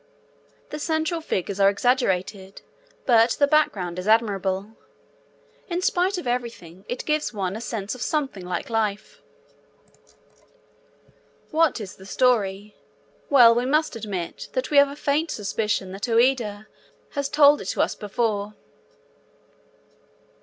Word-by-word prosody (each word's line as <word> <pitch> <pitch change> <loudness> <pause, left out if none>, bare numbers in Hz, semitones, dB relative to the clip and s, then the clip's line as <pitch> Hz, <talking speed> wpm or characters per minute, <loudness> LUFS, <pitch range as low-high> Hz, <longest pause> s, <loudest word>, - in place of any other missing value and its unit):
The 300 - -5
central 320 +2 -1
figures 200 - -3
are 195 0 +6
exaggerated, 195 -4 -1 0.4
but 230 -1 +4
the 285 - +3
background 200 - +1
is 185 - -6
admirable. 200 -2 +1 1.0
In 355 0 -3
spite 365 +2 +1
of 355 - -6
everything, 230 -7 -5
it 245 - -4
gives 300 -6 -1
one 190 -1 -2
a 220 - -6
sense 215 -4 -4
of 255 - -9
something 270 -12 -2
like 180 +5 -4
life. 215 -2 -2 2.3
What 320 -4 +2
is 200 -4 -8
the 190 - -13
story? 210 -4 0 0.5
Well, 245 -5 +7
we 240 +2 0
must 305 0 +1
admit 200 -6 -5
that - - -2
we 290 - +3
have 280 0 +7
a 280 - -8
faint 300 +2 0
suspicion 205 -2 -2
that 195 +5 -5
Ouida 230 -3 +1 0.5
has 280 -1 -2
told 290 0 +5
it - - -8
to - - -1
us - - -2
before. 210 -1 -2
230 Hz, 130 wpm, -24 LUFS, 200-280 Hz, 2.3 s, Well